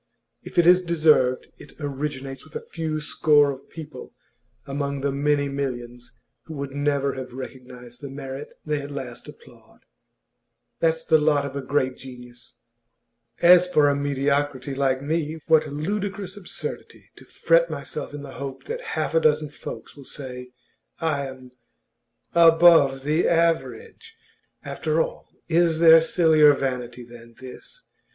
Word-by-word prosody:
If - - -12
it 175 - +5
is 180 +1 +6
deserved, 155 -7 +2
it - - -14
originates 140 -2 -5
with 155 - -18
a - - -6
few 160 -2 -3
score 150 -1 +3
of 135 0 -11
people 155 -5 -10 0.5
among 140 0 -3
the 140 0 0
many 145 +1 +1
millions 125 -3 -6 0.3
who 160 - -9
would 140 -1 -5
never 140 0 0
have 130 -2 -8
recognised 125 -2 -10
the 140 - -7
merit 135 +1 -8
they 150 -1 -1
at 140 - -8
last 130 -4 -7
applaud. - - -17 1.0
That's 160 0 0
the 160 -1 +4
lot 150 -2 +2
of 140 -1 -7
a 140 - -3
great 130 -1 -1
genius. 125 -2 -13 0.9
As 180 +1 +7
for 145 -3 +4
a 140 - +1
mediocrity 140 -1 -1
like 135 -1 0
me 160 +1 -2
what 160 -1 +3
ludicrous 195 +5 -4
absurdity 200 -3 -8
to - - -15
fret - - +2
myself - - -6
in 145 0 -8
the - - -9
hope 135 -1 -7
that 475 +3 -5 0.2
half - - -1
a 165 - +4
dozen 150 -1 +2
folks - - -9
will 140 - -12
say 125 -2 -8 0.5
I 145 -4 -1
am 130 -1 -12 0.8
"above 165 -5 +6
the 155 +4 +1
average!" 165 -8 -1 0.5
After 155 +1 -2
all, - - -3 0.2
is 170 -1 +2
there 165 0 +8
sillier 160 -3 +5
vanity 125 -2 -4
than 120 -1 -15
this? 130 - -12
145 Hz, 145 wpm, -24 LUFS, 130-160 Hz, 1.0 s, there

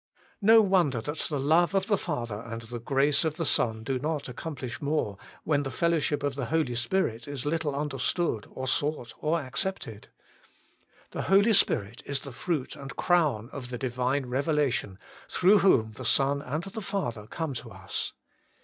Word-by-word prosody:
3. 200 - -2
No 225 0 +9
wonder 175 - +3
that 150 +7 -4
the 145 -3 -1
love 165 +7 +3
of 190 -1 +2
the 205 - +3
Father 120 - -3
and 115 0 -6
the 120 +1 -6
grace 140 +5 +2
of 160 -2 -1
the 165 - -2
Son 110 -5 +1
do 130 +2 -1
not 150 +1 -2
accomplish 130 -1 -6
more, 145 -8 0 0.3
when 145 -2 +2
the 135 - -3
fellowship 150 +1 +1
of 145 -1 0
the 135 -1 -3
Holy 155 -5 +1
Spirit 120 -1 -1
is 145 -2 -5
little 150 -2 0
understood 140 - -1
or 130 0 -5
sought 145 -2 -1
or 160 +2 +1
accepted. 130 - -4 1.0
The - - -3
Holy 200 +4 +6
Spirit 110 - +2
is 140 -1 -1
the 140 - -8
fruit 150 +2 -2
and 140 -2 -8
crown 150 - +2
of 130 -3 -7
the 125 - -4
Divine 130 +2 -1
Revelation, 135 - 0 0.3
through 195 +3 +5
whom 115 - +4
the 110 - -9
Son 140 +1 +2
and 150 +4 -3
the 195 +3 -6
Father 120 - -3
come 160 0 -3
to 120 - -6
us. - - -3
145 Hz, 175 wpm, -28 LUFS, 125-165 Hz, 1.0 s, No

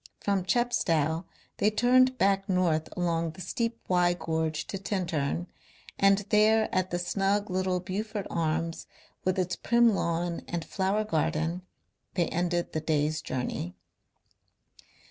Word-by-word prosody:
From 195 -2 0
Chepstow 170 -8 +1 0.3
they 210 - +3
turned 255 +4 +4
back 195 -1 +2
north 170 -4 +1
along 165 -2 0
the 185 - -10
steep 230 +6 -2
Wye 175 -1 +3
gorge 160 -2 -2
to 195 - -5
Tintern, 175 -5 -1 0.5
and 195 0 +4
there 215 +1 +4
at 185 0 +1
the 175 - -1
snug 195 +3 0
little 185 0 0
Beaufort 205 +3 -4
Arms 165 0 -1 0.4
with 185 0 +1
its 180 -1 0
prim 235 +2 +3
lawn 170 -2 -1
and 170 -2 -3
flower 195 +3 0
garden 165 -1 -1 0.5
they 175 -2 +2
ended 175 0 -1
the 155 - -1
day's 155 0 0
journey. 125 - -4
180 Hz, 130 wpm, -28 LUFS, 165-200 Hz, 0.5 s, turned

